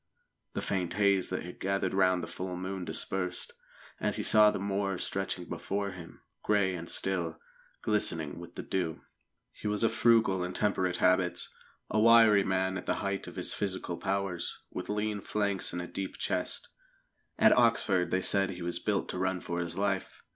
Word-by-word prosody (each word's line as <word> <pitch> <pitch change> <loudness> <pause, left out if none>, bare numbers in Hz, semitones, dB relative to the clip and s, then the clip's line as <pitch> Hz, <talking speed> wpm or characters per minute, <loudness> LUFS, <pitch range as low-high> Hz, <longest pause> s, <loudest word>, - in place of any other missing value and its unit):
The - - -3
faint 90 -3 -1
haze 100 -2 +2
that 90 - -3
had 90 +1 -9
gathered 100 0 0
round 95 -2 +3
the - - -4
full 90 +1 -5
moon 95 0 -4
dispersed, 90 0 -2 0.5
and - - -1
he - - -3
saw 105 -1 +7
the - - -2
moor 100 -1 -1
stretching 95 -1 -3
before 100 +3 -3
him, 90 -3 -11 0.2
grey 100 -3 +2
and 85 -1 -6
still, 90 -4 0 0.5
glistening 85 -8 0
with 85 - -11 0.2
dew. 85 -4 -1 0.5
He - - -7
was 105 +1 0
of 115 - +4
frugal 110 -6 +4
and 90 0 -3
temperate 95 -4 +1
habits, 90 -1 +2 0.4
a 110 - 0
wiry 110 -2 +7
man 95 0 0
at - - -11
the - - +2
height 100 0 -2
of - - -9
his - - -1
physical 95 -3 -3
powers, 95 -2 -2
with - - -6
lean 105 0 -1
flanks 100 -2 -1
and 90 - -3
a - - -6
deep 95 +1 -5
chest. - - -2 0.7
At - - +6
Oxford 115 -6 +3
they 95 - +2
had 95 - -2
said 100 -1 +2
he 90 -1 -6
was 85 0 -1
built - - 0
to 90 - -3
run 95 0 0
for 85 0 -4
his 85 0 -4
life. 100 -1 -2
95 Hz, 185 wpm, -30 LUFS, 90-100 Hz, 0.7 s, saw